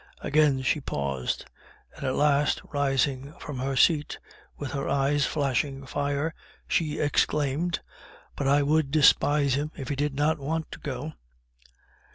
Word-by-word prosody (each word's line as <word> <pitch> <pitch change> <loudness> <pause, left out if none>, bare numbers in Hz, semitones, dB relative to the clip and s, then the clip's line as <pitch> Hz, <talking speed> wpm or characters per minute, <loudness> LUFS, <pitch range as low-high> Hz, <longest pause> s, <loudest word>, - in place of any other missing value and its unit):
Again 145 -3 +2
she 145 +3 +1
paused; 70 - -3 0.5
and - - -9
at 130 -1 0
last 145 0 +3
rising 140 0 0
from 140 -3 -6
her 135 +1 -1
seat, 150 +2 +3 0.4
with 145 -3 -5
her 140 -1 -3
eyes 140 +1 +2
flashing 135 -1 -1
fire, 145 +3 -1 0.3
she 155 -3 0
exclaimed 150 +2 +1 0.5
"BUT 140 - -2
I 145 +1 +4
WOULD 150 0 +2
DESPISE 145 -1 +4
HIM, 145 +3 -1
IF 135 -4 -6
HE 145 - -1
DID 145 0 -1
NOT 150 +2 +1
WANT 160 +3 -3
TO - - -8
GO!" 145 +1 -5
145 Hz, 145 wpm, -27 LUFS, 135-150 Hz, 0.5 s, I